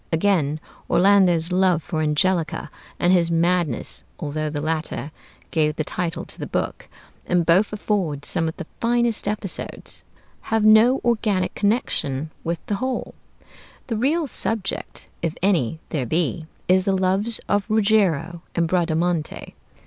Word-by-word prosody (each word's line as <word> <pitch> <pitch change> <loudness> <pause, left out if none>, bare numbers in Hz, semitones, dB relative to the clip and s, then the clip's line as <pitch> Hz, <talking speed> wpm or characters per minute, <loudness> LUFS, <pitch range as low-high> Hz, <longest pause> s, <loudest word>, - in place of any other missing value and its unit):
Again, 160 -4 +1 0.3
Orlando's 180 -3 +4
love 180 -3 +2
for 155 +2 -2
Angelica, 160 +2 0 0.3
and 180 +1 +3
his 170 -2 +3
madness, 170 -5 0 0.2
although 155 +1 -2
the 145 -1 -3
latter 155 -1 -2 0.4
gave 150 -2 +1
the 155 - -1
title 170 +1 -3
to - - -10
the - - -4
book, - - -3 0.4
and 175 -1 +2
both 180 +6 +4
afford 190 -9 -2
some 165 -3 0
of 160 - -5
the 175 - -6
finest 235 -2 +1
episodes, 205 -2 -5 0.5
have 225 -1 +2
no 220 +5 +6
organic 215 -5 +1
connection 155 - -1
with 170 0 -3
the 205 - -1
whole. 260 -1 -2 0.7
The 230 - -3
real 295 +9 +1
subject, 225 -6 0
if 165 -1 -2
any 160 - +1
there 135 -6 -2
be, 160 +2 -1 0.2
is 185 +1 +3
the 195 -2 +2
loves 195 +5 +1
of 205 +1 0
Ruggiero 200 -6 +2
and 170 -1 +2
Bradamante. 170 -2 -1
180 Hz, 140 wpm, -22 LUFS, 160-205 Hz, 0.7 s, no